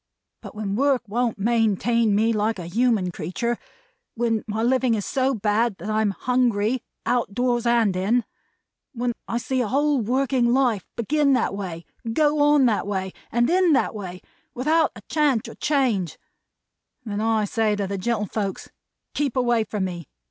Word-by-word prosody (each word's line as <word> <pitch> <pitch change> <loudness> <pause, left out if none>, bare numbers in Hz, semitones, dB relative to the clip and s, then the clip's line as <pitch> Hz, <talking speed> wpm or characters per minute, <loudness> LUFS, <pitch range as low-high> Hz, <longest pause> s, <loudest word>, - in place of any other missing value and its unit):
But - - -10
when 205 -2 -3
work 270 +1 +2
won't 235 +2 -1
maintain 225 0 +2
me 225 +2 +2
like 215 +1 0
a 175 - -6
human 215 -1 +1
creetur; 230 +9 -3 0.6
when 225 -2 0
my 220 +1 -2
living 255 -1 +2
is 205 - -3
so 265 0 0
bad, 215 0 +1
that 205 +6 -5
I 215 0 +1
am 215 - +2
Hungry, 240 +1 +1 0.2
out 245 -4 +1
of 200 - -16
doors 245 -1 +1
and 230 -5 +3
in; 210 +6 +1 0.7
when 245 -1 -1
I 235 - -1
see 255 +2 -1
a 235 - -1
whole 285 +2 +2
working 250 +1 +1
life 245 -7 +2
begin 280 +4 +2
that 250 -5 +1
way, 180 -4 -6 0.3
go 300 +2 +2
on 290 -2 +5
that 215 -4 +1
way, 190 -2 -3 0.2
and 240 +1 +2
end 355 -3 +4
that - - +1
way, 185 -4 -7 0.3
without 310 +5 +2
a 210 - -10
chance 290 -7 +1
or - - -8
change; 250 - 0 0.9
then 210 -1 -3
I 220 -1 +1
say 215 0 +1
to 205 -1 -2
the 195 0 -4
gentlefolks 210 -2 -2 0.4
'Keep 285 -4 -1
away 240 -3 +2
from 205 -2 -2
me! 175 -5 -6
230 Hz, 170 wpm, -23 LUFS, 205-255 Hz, 0.9 s, on